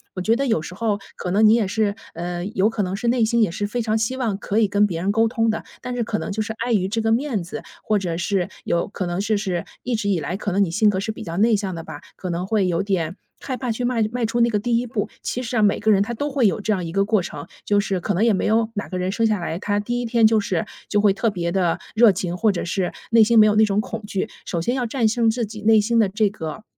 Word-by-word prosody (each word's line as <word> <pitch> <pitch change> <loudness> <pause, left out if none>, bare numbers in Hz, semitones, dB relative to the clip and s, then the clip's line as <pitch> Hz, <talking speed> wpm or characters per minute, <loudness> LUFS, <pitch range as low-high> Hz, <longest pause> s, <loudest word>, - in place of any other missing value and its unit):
我 185 - -3
觉 220 +5 +2
得 275 +3 -1
有 220 -10 +1
时 180 - -8
候， 210 -1 -1 0.2
可 180 - -4
能 210 +3 +4
你 215 - +6
也 225 -4 +2
是 205 0 0 0.2
呃， 175 +1 -4
有 205 0 +1
可 220 -2 -2
能 185 0 -2
是 235 +4 -3
内 235 -1 +3
心 230 +1 +2
也 205 - +2
是 205 +4 -2
非 240 +3 -2
常 220 0 0
希 225 +4 -1
望 225 -6 -1
可 200 +1 -3
以 215 - +4
跟 205 +1 +3
别 170 -5 -3
人 195 +3 +1
沟 225 +1 +3
通 225 -2 +1
的， 220 - -2 0.2
但 250 0 -4
是 240 - 0
可 215 -1 -2
能 - - -4
就 215 +2 -2
是 220 - -3
碍 235 +1 -2
于 190 -3 +2
这 225 +3 -1
个 225 0 +1
面 240 -4 0
子， 170 - -7 0.2
或 215 -1 +1
者 170 -3 -3
是， 180 +1 -1 0.2
有 170 - 0
可 195 -2 -4
能 175 +2 -2
就是 200 -4 -1 0.2
一 245 -1 -1
直 205 -2 -1
以 185 - +1
来 165 +5 -3
可 205 0 -3
能 200 +2 +3
你 165 - -5
性 210 +4 +3
格 190 -2 0
是 220 +2 -2
比 - - -8
较 165 +1 -5
内 220 +1 +4
向 195 -2 -2
的 165 - -6
吧， 145 - -9 0.2
可 185 - -5
能 180 +2 -3
会 210 -3 +2
有 175 +2 0
点 185 -3 -1 0.2
害 260 - -4
怕 250 -2 -3
去 245 +2 -2
迈 240 -3 +1
迈 245 -1 -1
出 235 +2 0
那 235 - +4
个 210 -2 0
第 235 +2 +1
一 245 - -3
步。 220 -3 -2
其 250 - -3
实 240 0 -4
啊， 220 - +3
每 205 -1 +3
个 220 - 0
人 200 -2 +5
他 235 - -4
都 290 +6 -2
会 265 -6 +3
有 195 - 0
这 215 +1 0
样 185 - -2
一 165 - -5
个 195 +2 +1
过 215 -2 +2
程， 175 - -7 0.2
就 205 0 +2
是 195 -3 -1
可 205 - -1
能 200 +5 +2
也 230 - +4
没 190 - 0
有 220 +1 +2
哪 205 - -4
个 185 - -3
人 185 +1 -1
生 230 - +1
下 215 -2 +1
来， 170 -1 -3
他 205 0 0
第 240 +4 -2
一 245 - -3
天 230 -1 +4
就 220 0 +3
是， 185 -4 -1 0.2
就 205 - +2
会 205 -1 +4
特 225 +3 0
别 170 -3 -2
地 180 -3 +1 0.2
热 225 -1 +7
情， 180 -1 -3
或 215 +3 +2
者 180 - -3
是 180 +1 -1 0.2
内 225 -1 +7
心 230 +1 +5
没 215 - +8
有 210 - +2
那 220 - +6
种 205 -1 +1
恐 220 0 -4
惧， 195 +1 -2 0.2
首 170 - -2
先 240 +9 0
要 250 -2 -1
战 230 -1 +1
胜 230 +1 +2
自 230 +1 0
己 215 0 -9
内 220 0 +5
心 230 +3 +1
的 210 -4 +4
这 210 +1 +1
个 160 -1 -7
210 Hz, 335 characters per minute, -22 LUFS, 190-225 Hz, 0.2 s, 没